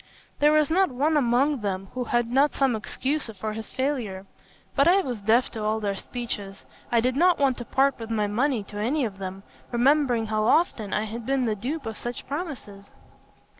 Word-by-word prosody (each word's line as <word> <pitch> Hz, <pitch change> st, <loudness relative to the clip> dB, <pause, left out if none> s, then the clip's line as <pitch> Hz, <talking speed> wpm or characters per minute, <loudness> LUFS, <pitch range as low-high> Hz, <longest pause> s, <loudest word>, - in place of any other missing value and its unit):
There 295 Hz, +1 st, +5 dB
was 305 Hz, -1 st, +3 dB
not 375 Hz, +2 st, +3 dB
one 290 Hz, +5 st, +1 dB
among 270 Hz, 0 st, +2 dB
them 195 Hz, -1 st, -3 dB
who 255 Hz, -1 st, -3 dB
had 240 Hz, 0 st, +1 dB
not 275 Hz, +3 st, +3 dB
some 270 Hz, -4 st, +2 dB
excuse 265 Hz, +6 st, -2 dB
for 215 Hz, +2 st, -3 dB
his 220 Hz, 0 st, -7 dB
failure; 240 Hz, -9 st, -2 dB, 0.5 s
but 280 Hz, +2 st, +4 dB
I 380 Hz, +3 st, +5 dB
was 250 Hz, -, -4 dB
deaf 225 Hz, +5 st, +2 dB
to 220 Hz, -, -5 dB
all 215 Hz, +1 st, 0 dB
their 205 Hz, -2 st, -1 dB
speeches. 200 Hz, -3 st, -6 dB, 0.3 s
I 235 Hz, -, +4 dB
did 255 Hz, +2 st, 0 dB
not 350 Hz, +4 st, +4 dB
want 270 Hz, -3 st, +2 dB
to 240 Hz, -, -6 dB
part 270 Hz, +1 st, +2 dB
with 225 Hz, -1 st, -7 dB
my 215 Hz, -2 st, +1 dB
money 235 Hz, +3 st, 0 dB
to 205 Hz, +1 st, -8 dB
any 260 Hz, +6 st, +1 dB
of 195 Hz, -3 st, -6 dB
them, 190 Hz, 0 st, -6 dB, 0.3 s
remembering 250 Hz, -1 st, +3 dB
how 215 Hz, 0 st, 0 dB
often 225 Hz, -, +2 dB
I 210 Hz, -, 0 dB
had 225 Hz, +2 st, -6 dB
been 270 Hz, -2 st, +1 dB
the 220 Hz, -, +1 dB
dupe 265 Hz, +7 st, -4 dB
of 220 Hz, -1 st, -5 dB
such 240 Hz, 0 st, -5 dB
promises. 265 Hz, -, -6 dB
240 Hz, 205 wpm, -25 LUFS, 215-280 Hz, 0.5 s, There